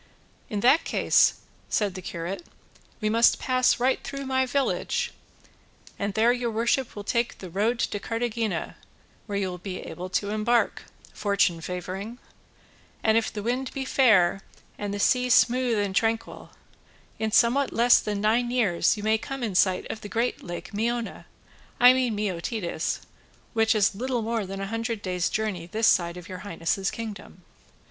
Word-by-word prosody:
"In 205 -1 -2
that 270 +8 +5
case," - - +3 0.3
said 205 -3 0
the 185 - -7
curate, 175 - -5 0.6
"we 215 - 0
must 230 +2 +4
pass 255 -1 +2
right 255 +2 +1
through 275 0 -5
my 260 0 +1
village, 280 - -1 0.9
and 200 0 -2
there 230 +2 +4
your 245 -1 -2
worship 235 +3 0
will 205 - -6
take 235 +3 -1
the 185 -3 -9
road 215 +6 +1
to 205 - -1
Cartagena, 230 -5 -2 0.5
where 200 -2 -2
you 195 -1 0
will 180 -1 -6
be 185 +1 -5
able 180 +1 -7
to 200 +2 -1
embark, 225 +3 +1 0.3
fortune 200 -5 +1
favouring; 185 +6 -5 0.9
and 220 0 +3
if 225 -1 +1
the 210 - -5
wind 250 +3 -1
be 270 -1 -3
fair 210 -9 +4 0.3
and 205 -1 -4
the 200 - -3
sea 250 +3 +2
smooth 245 0 +4
and 200 -2 -1
tranquil, 225 +1 -1 0.7
in 220 -1 -1
somewhat 255 +5 +3
less 240 +1 +5
than 205 -1 -3
nine 230 +3 +2
years 220 -7 +2
you 205 - -6
may 220 +1 +2
come 270 +2 -6
in 220 -4 -2
sight 185 0 +2
of 215 - -7
the 205 - -8
great 235 +3 -1
lake 175 +2 -7
Meona, 230 +2 -2 0.5
I 250 0 +9
mean 255 -4 0
Meotides, 185 -3 -2 0.5
which 225 0 +3
is 205 -1 +3
little 245 +2 -2
more 225 -3 -2
than 195 +1 -5
a - - -2
hundred 230 -1 -3
days' 180 -2 -1
journey 205 -6 -2
this 220 +5 0
side 170 -4 +3
of 180 0 -10
your 185 -1 -7
highness's 190 +1 -2
kingdom." 215 - -8
220 Hz, 170 wpm, -26 LUFS, 195-240 Hz, 0.9 s, I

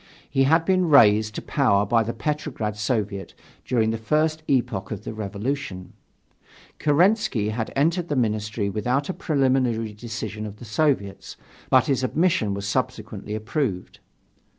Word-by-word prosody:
He 135 0 +2
had 160 +4 +3
been 185 -2 +2
raised 110 -6 +5
to - - -5
power 105 -8 +2
by 115 +3 +3
the 115 +1 -2
Petrograd 145 -8 -3
Soviet 105 -3 -2 0.3
during 110 -3 +1
the 115 - -3
first 155 +6 +1
epoch 120 -7 0
of 105 -2 -6
the - - -5
revolution: 105 -1 -4 0.9
Kerensky 155 - +2
had 110 +1 -3
entered 170 +5 +1
the 145 - 0
Ministry 110 -3 -1
without 125 - -1
a - - -1
preliminary 130 - 0
decision 110 -1 -5
of 105 0 -10
the 120 - -11
Soviets, 105 -5 -1 0.3
but - - +5
his 135 -2 0
admission 130 - +1
was 100 0 -5
subsequently 105 +1 -3
approved. 110 - -3
115 Hz, 145 wpm, -24 LUFS, 105-145 Hz, 0.9 s, raised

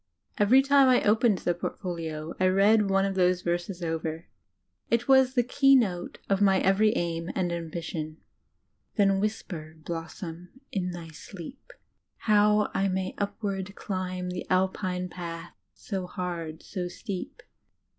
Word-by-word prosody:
Every 245 +6 +6
time 280 -1 +5
I 255 -1 +4
opened 215 0 +4
the 175 - 0
portfolio 165 -3 -5
I 185 - +4
read 200 +2 +4
one 195 0 +3
of 195 - -1
those 180 -1 +2
verses 175 +1 -2
over; 160 0 -3 0.6
it 235 +1 +1
was 265 -1 +5
the 245 - +4
key 275 +2 +5
note 190 -9 0
of 195 0 +1
my 195 -2 +5
every 215 +3 +3
aim 170 0 -2
and 180 -2 0
ambition: 165 -2 -4 0.8
"Then 195 -2 +3
whisper, 175 -7 -4
blossom, 165 +4 -7
in 180 -2 -1
thy 175 -2 -7
sleep 180 - -11 0.5
How 210 0 +3
I 195 0 +1
may 185 0 -2
upward 200 -1 -3
climb 185 -2 -3
The 180 - -5
Alpine 185 -1 0
path, 170 -4 -7 0.2
so 190 -3 -4
hard, 170 -4 -5
so 180 -2 -4
steep. 185 +1 -6
185 Hz, 140 wpm, -27 LUFS, 170-205 Hz, 0.8 s, Every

